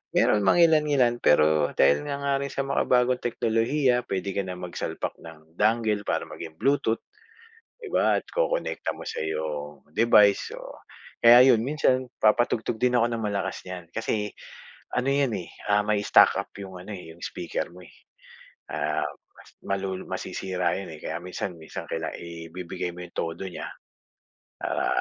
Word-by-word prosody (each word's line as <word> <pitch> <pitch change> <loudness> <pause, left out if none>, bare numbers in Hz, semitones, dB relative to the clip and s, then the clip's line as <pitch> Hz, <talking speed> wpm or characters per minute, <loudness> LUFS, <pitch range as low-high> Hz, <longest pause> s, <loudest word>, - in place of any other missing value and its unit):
Meron 105 - +4
mangilan-ngilan 150 -8 +4
pero, 75 -2 +4
dahil 75 +1 +3
nga 140 - -2
nga 140 0 +1
rin 140 0 -3
sa 140 - -2
makabagong 125 -2 +2
teknolohiya, 120 +2 +1
puwede 95 0 -2
ka 100 - -1
na 90 - -4
magsalpak 90 -1 -4
ng 80 0 -14
dongle 110 -2 +2
para - - 0
maging 80 -1 -9
bluetooth, 135 -3 +1 0.8
'di 450 - -8
ba - - +3
at - - -19
kokonekta - - -1
mo - - -9
sa - - -4
iyong 75 -2 -4
device, 105 -2 +4
o - - -10 0.4
kaya 120 +2 +9
'yun 110 - +2
minsan 130 -1 +1
papatugtog 110 0 +2
din 125 0 +3
ako 115 - +4
ng 115 -1 -2
malakas 100 -2 -2
niyan 90 -2 -7
kasi 105 -2 -2 0.6
ano 125 +2 +1
'yan, 140 -3 +2
eh, 85 - -6 0.2
ah, 105 0 +4
may 105 -1 +1
stuck - - +6
up - - -4
'yung 95 -2 -8
ano, 90 +4 -8
eh, 90 -4 -9
'yung 85 - -20
speaker 85 - -3
mo, 90 - -13
eh. 90 - -15 0.8
Ah, - - -1 0.3
mas - - -17 0.2
malu 95 -1 -3
masisira 90 -2 -2
'yun, 95 - -7
eh, 75 - -12
kaya 80 - -3
minsan 90 0 -5
minsan 80 - -7
kailangan 80 -1 -3
ibibigay 85 +1 -6
mo 90 - -8
'yung 90 - -11
todo 80 +3 -3
niya, 90 - -6 0.9
para - - -1
100 Hz, 165 wpm, -26 LUFS, 85-125 Hz, 0.9 s, kaya